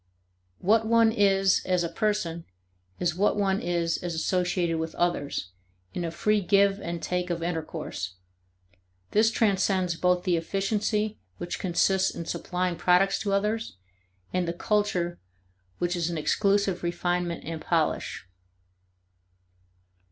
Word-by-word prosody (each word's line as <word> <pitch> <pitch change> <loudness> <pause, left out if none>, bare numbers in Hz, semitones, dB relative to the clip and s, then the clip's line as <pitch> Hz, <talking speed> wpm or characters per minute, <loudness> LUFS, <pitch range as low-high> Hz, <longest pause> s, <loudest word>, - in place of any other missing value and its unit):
What 220 - +2
one 230 0 +5
is 195 -3 +3
as 180 -1 +1
a - - 0
person 175 -5 -1 0.5
is 175 -2 +1
what 200 +4 +1
one 195 -1 +1
is 170 -1 0
as 175 -2 -4
associated 175 0 0
with 160 0 -4
others, 145 - -1 0.4
in 175 - -3
a 170 - -1
free 210 +5 +1
give 200 +1 +3
and 170 -2 -5
take 180 0 -1
of 170 -1 -2
intercourse. 160 - -4 1.0
This 220 +1 +4
transcends 195 -5 +1
both 180 +1 +1
the 180 -3 +2
efficiency 210 +4 -1 0.2
which 175 - -5
consists 190 +1 +2
in 170 - -5
supplying 180 0 -2
products 180 +3 +3
to 200 -2 -1
others 210 - -1 0.6
and 180 -1 0
the 170 - -1
culture 180 -3 0 0.6
which 175 +1 -1
is 170 -1 -1
an 170 - -3
exclusive 200 +3 +1
refinement 175 0 -1
and 160 0 -5
polish. 160 - -1
180 Hz, 130 wpm, -27 LUFS, 170-200 Hz, 1.0 s, one